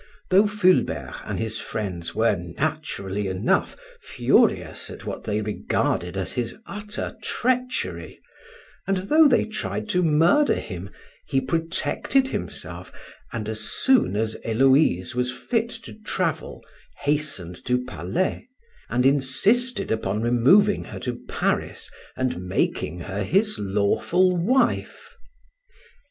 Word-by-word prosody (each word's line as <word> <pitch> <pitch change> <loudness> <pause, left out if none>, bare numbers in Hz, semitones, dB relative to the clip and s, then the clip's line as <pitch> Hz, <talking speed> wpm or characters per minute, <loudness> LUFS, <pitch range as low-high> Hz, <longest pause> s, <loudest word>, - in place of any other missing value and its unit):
Though 195 +3 +6
Fulbert 205 -3 +1
and - - -3
his 110 0 -2
friends 90 -6 -4
were, 110 -2 +3
naturally 100 - -3
enough, 95 0 0 0.2
furious - - +1
at - - -10
what - - -5
they 105 0 0
regarded 95 -3 -1
as 95 - -2
his 120 -2 -3
utter 210 +1 -5
treachery, 250 +3 -2 0.7
and 195 0 +2
though 300 +12 +5
they 265 - +3
tried 215 0 -4
to 180 -3 +2
murder 170 - +4
him, 95 -1 -6 0.4
he 135 - +2
protected 165 - 0
himself, - - -5 0.4
and 110 -3 -4
as 110 0 -3
soon 220 - +3
as 110 +1 -1
Héloïse 120 - +3
was 125 +1 0
fit 225 - -1
to 230 -1 -8
travel, 185 -7 -3 0.4
hastened 140 - -2
to 125 0 0
Palais, 110 - -2 0.4
and 125 - +1
insisted 170 - +2
upon 110 -1 -1
removing 135 - +4
her - - -8
to 120 -1 -4
Paris - - -1 0.3
and 125 -9 -1
making 90 -2 -1
her 100 +4 -4
his 205 - +1
lawful 105 - +2
wife. 260 - 0
135 Hz, 120 wpm, -24 LUFS, -, 0.7 s, Though